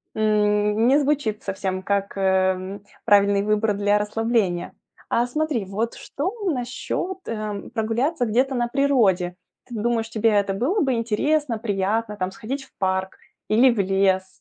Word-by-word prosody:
м, 210 +1 +2
не 275 +3 +5
звучит 275 -7 0
совсем 190 -1 -3
как, 200 0 -1
э, - - -2
м, 190 +1 0 0.2
правильный 200 -1 +4
выбор 210 0 +1
для 205 +1 +2
расслабления. 210 -4 0 0.4
А 235 - +2
смотри, 295 -5 -1
вот 215 +5 -3
что 340 +8 -4 0.2
насчёт, 265 +8 -3
э, 215 -2 -4
прогуляться 245 +6 0
где-то 255 +4 +1
на 240 -1 0
природе? 225 -10 +2 0.3
Ты 240 - -8
думаешь, 225 +1 -1
тебе 225 0 +2
это 200 -1 +2
было 305 - 0
бы 265 -3 +2
интересно, 240 +4 0
приятно, 210 0 -1
там, 185 -1 -2
сходить 265 +8 -5
в - - -20
парк 190 0 -1 0.3
или 235 +5 +5
в 235 - -2
лес? 190 -1 +2
215 Hz, 150 wpm, -23 LUFS, 200-245 Hz, 0.4 s, не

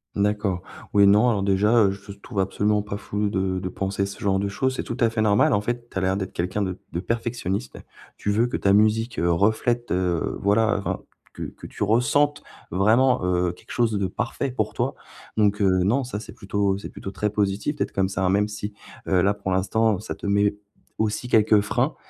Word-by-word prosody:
D'accord. 100 -3 0 0.3
Oui, 100 -1 +6
non, 105 +5 +5
alors, 100 -4 0
déjà, 105 +4 +4
heu, 95 - +2
je 100 +1 -9
te 100 - -20
trouve 105 -1 -5
absolument 105 +2 +1
pas 105 -1 -5
fou 105 0 -2
de 95 -1 -1
de 90 0 -4
penser 100 +1 -2
ce 100 - -9
genre 95 -1 +1
de 100 - -1
choses. 130 +6 -1
C'est - - -3
tout 120 - -5
à 115 - +5
fait 110 -1 -1
normal, 105 -1 +4
en 100 - +2
fait. 120 +2 -3
Tu - - -7
as - - -3
l'air 95 +1 +1
d'être 95 -2 -4
quelqu'un 95 +4 -1
de 95 -1 -4
de 85 - -2
perfectionniste. 115 -1 -3 0.4
Tu 105 - -1
veux 115 +4 +2
que 120 - -2
ta 100 - +3
musique, 110 +3 +2
heu, 85 - +2
reflète, 110 +6 +1
heu, 90 -2 0
voilà, 110 +3 +3
enfin, 100 - -3 0.3
que - - -6
que - - -8
tu - - -4
ressentes 135 +7 +2 0.3
vraiment, 110 +7 +3
heu, 90 -1 +1
quelque 90 - -15
chose 115 -3 +1
de 95 - 0
parfait 120 +7 -3
pour 110 -4 -2
toi. - - -1 0.4
Donc 105 -1 +2
heu, 95 -2 +3
non, 120 +9 +2
ça, 120 -5 -5
c'est 110 - -10
plutôt 100 0 -1
c'est - - -7
plutôt 95 - -7
très 105 +1 -1
positif, 105 +7 -1
peut-être, - - -2
comme 95 -1 0
ça, 95 0 -2
hein, - - +3
même 105 +1 +2
si, 105 0 -6 0.3
heu, 90 -2 +3
là, 100 +3 +2
pour 100 -2 -4
l'instant, 100 +2 +1
ça 110 - -6
te - - -10
met 100 0 +2 0.5
aussi 110 +3 -1
quelques 110 -2 +5
freins, 125 +8 0
105 Hz, 225 wpm, -24 LUFS, 95-110 Hz, 0.5 s, Oui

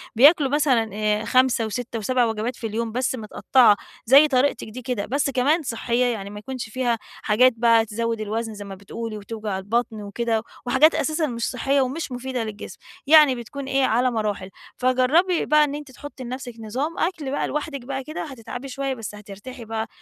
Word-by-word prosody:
بياكلوا 285 +3 +6
مثلًا 265 -6 +2
آآ، 210 +1 0
5 255 -3 +3
و6 230 +1 -4
و7 245 +3 +1
وجبات 225 +2 -2
في 225 - -5
اليوم، 225 +1 -3
بس 250 +2 -1
مِتقطَّعة، 225 0 +3 0.3
زي 275 +6 +7
طريقتِك 265 -4 +1
دي 250 +4 -8
كده، 240 -4 -3
بس 280 +2 0
كمان 275 +6 +2
صحية 240 -1 0
يعني، 215 -5 -2
ما 205 0 -8
يكونش 250 +1 -6
فيها 240 0 0
حاجات 250 +4 +2
بقى 230 -1 +4
تزود 230 +1 -2
الوزن 220 +1 -3
زي 205 -1 -8
ما 195 -1 -8
بتقولي 215 +3 -6
وتوجع 210 -1 -5
البطن 220 +2 -2
وكده، 220 +2 -2 0.2
وحاجات 270 +6 +5
أساسًا 310 0 0
مش 235 -3 -2
صحية 270 +3 +1
ومش 270 +3 -3
مفيدة 250 -1 -3
للجسم. 215 -1 -8 0.3
يعني 300 -3 +7
بتكون 250 +4 -7
إيه، 270 0 +1
على 245 +2 +2
مراحل. 210 -4 -2 0.3
فجربي 260 +8 +2
بقى 300 0 +5
إن 290 -1 -1
أنتِ 295 -2 -8
تحطي 280 0 -10
لنفسك 250 0 -6
نظام 260 +9 -3
أكل 320 -6 -1
بقى 285 - -1
لوحدك 295 -2 -4
بقى 270 0 -4
كده 310 +3 -5
هتتعبي 260 -2 -8
شوية، 275 0 -3
بس 225 -4 -7
هترتاحي 210 +4 -10
بقى، 220 0 -3
245 Hz, 185 wpm, -23 LUFS, 220-270 Hz, 0.3 s, زي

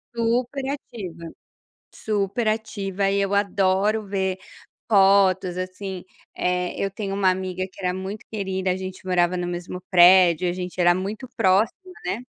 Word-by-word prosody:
Super 245 +4 0
ativa. 195 - -7 0.7
Super 210 +2 -1
ativa 200 -3 -1
e 200 - +1
eu 200 0 -1
adoro 200 +1 +1
ver 190 -1 -1 0.5
fotos, 190 -2 +4
assim, 185 0 -5 0.3
é, 180 0 -1
eu 195 - 0
tenho 195 0 -4
uma 195 -1 +2
amiga 185 0 -1
que - - -21
era 180 - +1
muito 190 +3 -6
querida, 190 -3 -2
a 180 - 0
gente 185 0 -7
morava 180 -1 +2
no 175 0 -2
mesmo 175 +1 -5
prédio, 180 -1 +6
a - - 0
gente 180 0 -5
era 175 0 +5
muito 205 +7 -4
próxima, 220 - +1
né. 205 +6 -2
190 Hz, 150 wpm, -23 LUFS, 185-205 Hz, 0.7 s, prédio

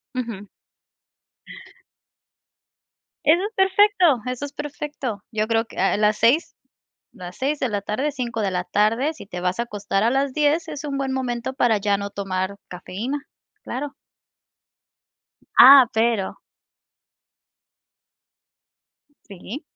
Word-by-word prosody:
Ujú. 225 -5 -5 2.8
Eso 340 +5 +5
es 425 +2 -4
perfecto, 385 0 +3 0.2
eso 250 +2 -4
es 285 - -7
perfecto. 290 -7 -5
Yo 215 0 0
creo 225 0 +1
que, - - -14
ah, 195 - +2
a - - +1
las 210 0 +2
6, 255 +9 +2 0.6
las 180 -1 -10
6 280 +3 -1
de 260 - -1
la 205 -2 -2
tarde, 265 +9 -2
5 235 -3 -4
de 195 -2 -1
la 180 0 -1
tarde, 230 +9 +1
si 200 - -12
te 180 -3 -7
vas 180 +3 -1
a 235 - 0
acostar 205 -2 -2
a 235 - +3
las 270 0 0
10, 305 +3 +1
es 300 -1 -7
un 280 -2 -3
buen 270 -1 -2
momento 245 -1 -3
para 240 -5 +2
ya 200 0 +1
no 200 0 -5
tomar 195 0 -3
cafeína, 205 +10 -5 0.5
claro. 275 +3 -5 1.7
Ah, 265 -2 +10
pero 225 -3 0 2.9
Sí. 200 - -8
235 Hz, 135 wpm, -22 LUFS, 205-280 Hz, 2.9 s, Ah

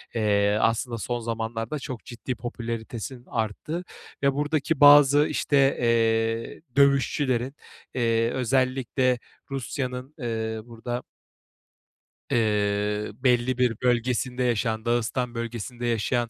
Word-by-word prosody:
eee, 105 -2 +2
aslında 115 +1 +1
son 120 +2 -3
zamanlarda 115 +3 -3
çok 130 -4 -7
ciddi 125 +1 -5
popülaritesinin 120 +1 -6
arttığı 115 - -3 0.4
ve 140 0 +4
buradaki 150 +1 0
bazı, 145 0 +8
işte, 145 - 0 0.2
eee, 115 0 +1
dövüşçülerin, 140 -1 +2 0.4
eee, 115 -2 +2
özellikle 130 0 +1 0.3
Rusya'nın, 130 0 -4
eee, 110 -4 -3
burada 120 +1 -5 1.3
Eee, 105 -1 +1
belli 125 +2 +1
bir 125 -2 +2
bölgesinde 125 +1 +1
yaşayan, 110 -2 0
Dağıstan 120 +1 0
bölgesinde 115 +1 -5
yaşayan 120 +1 0
120 Hz, 100 wpm, -26 LUFS, 115-130 Hz, 1.3 s, bazı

